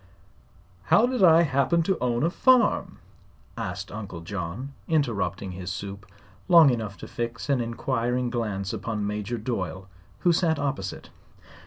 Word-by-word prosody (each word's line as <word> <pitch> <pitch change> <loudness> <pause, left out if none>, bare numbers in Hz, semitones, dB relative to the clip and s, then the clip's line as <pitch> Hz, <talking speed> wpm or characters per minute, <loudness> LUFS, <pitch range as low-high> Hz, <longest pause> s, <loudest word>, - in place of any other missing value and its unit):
"How 220 - +5
did 250 -2 -1
I 165 -1 +7
happen 145 +3 +2
to 190 +2 0
own 120 0 0
a 165 - +2
farm?" 255 +4 +3 0.6
asked - - -5
Uncle 100 -5 -7
John, 100 +9 -5
interrupting 100 - -1
his 90 0 -6
soup 100 +1 -7 0.4
long 165 -5 +8
enough 110 -4 -3
to - - -7
fix 120 +2 -5
an 130 -3 +2
inquiring 120 +1 -1
glance 105 -5 -2
upon 110 -3 -3
Major 105 +3 -3
Doyle, 95 -6 -4 0.3
who 175 - +4
sat 160 -2 +2
opposite. 135 -10 -4
120 Hz, 140 wpm, -26 LUFS, 100-145 Hz, 0.6 s, long